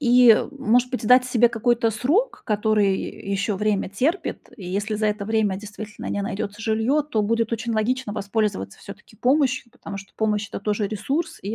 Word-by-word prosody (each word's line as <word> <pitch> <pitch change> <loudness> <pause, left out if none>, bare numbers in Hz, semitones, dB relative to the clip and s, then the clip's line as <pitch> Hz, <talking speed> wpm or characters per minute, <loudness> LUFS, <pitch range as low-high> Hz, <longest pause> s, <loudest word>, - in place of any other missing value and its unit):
И, 250 -2 +6
э, - - -2
может 250 -1 +2
быть, 250 -4 -3
дать 250 +2 +6
себе 240 -1 +4
какой-то 230 0 +1
срок, 305 - 0
который 210 -2 +2 0.3
ещё 200 +1 0
время 210 -1 0
терпит? 270 - -2
И 190 -6 -8
если 205 +4 -2
за 215 0 0
это 210 -1 -1
время, 215 -3 +1
действительно, 210 +1 -8
не 205 - -2
найдётся 200 +1 -4
жильё, 225 +7 +1
то 255 -8 -1
будет 230 +2 0
очень 230 +1 -2
логично 225 0 0
воспользоваться, 200 - -2
всё-таки, 205 +2 -13
помощью. 260 -1 +1
Потому 205 -5 -8
что, 195 - -12
помощь- 210 -2 0
это - - -6
тоже 210 0 -1
ресурс, 270 - -2
и, 205 +3 -3
220 Hz, 180 wpm, -23 LUFS, 205-245 Hz, 0.3 s, И